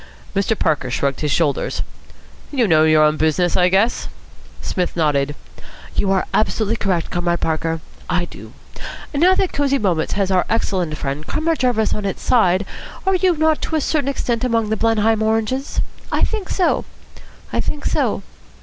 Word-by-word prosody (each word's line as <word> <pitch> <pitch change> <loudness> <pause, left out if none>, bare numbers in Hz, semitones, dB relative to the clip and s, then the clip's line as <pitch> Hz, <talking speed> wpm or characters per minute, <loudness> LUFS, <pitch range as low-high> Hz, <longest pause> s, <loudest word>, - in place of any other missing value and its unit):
Mr. 200 +2 +1
Parker 145 -6 0
shrugged 135 +2 -1
his 150 -2 0
shoulders. 145 -2 0 0.7
"You 255 -6 +1
know 155 -3 +5
your 155 -1 +5
own 150 0 +3
business, 160 +3 +1
I 180 0 +4
guess." 200 +6 +2 0.5
Psmith 180 -2 -2
nodded. 145 -2 +1 0.6
"You 195 - +1
are 190 -1 +2
absolutely 220 +1 +1
correct, 180 -6 -1
Comrade 175 -1 0
Parker. 165 0 -1 0.3
I 180 -1 +1
do. - - -12 0.6
Now 350 +6 +4
that 375 - 0
Cosy 280 -1 +2
Moments 180 -9 0
has 195 -1 0
our 185 -1 +2
excellent 185 -8 -1
friend 140 +3 -4
Comrade 320 +1 0
Jarvis 245 -4 +2
on 210 - -3
its 195 - -3
side, 195 -6 +3 0.4
are 385 - +3
you 365 -2 +2
not 315 0 +2
to 320 - -2
a 310 - +1
certain 285 -1 0
extent 245 -3 -1
among 230 -3 +1
the 220 - +1
Blenheim 225 0 +2
Oranges? 225 +5 0 0.3
I - - 0
think 430 -4 -1
so. 365 - +1 0.7
I - - +1
think 295 - -4
so." - - 0
200 Hz, 170 wpm, -20 LUFS, 165-255 Hz, 0.7 s, know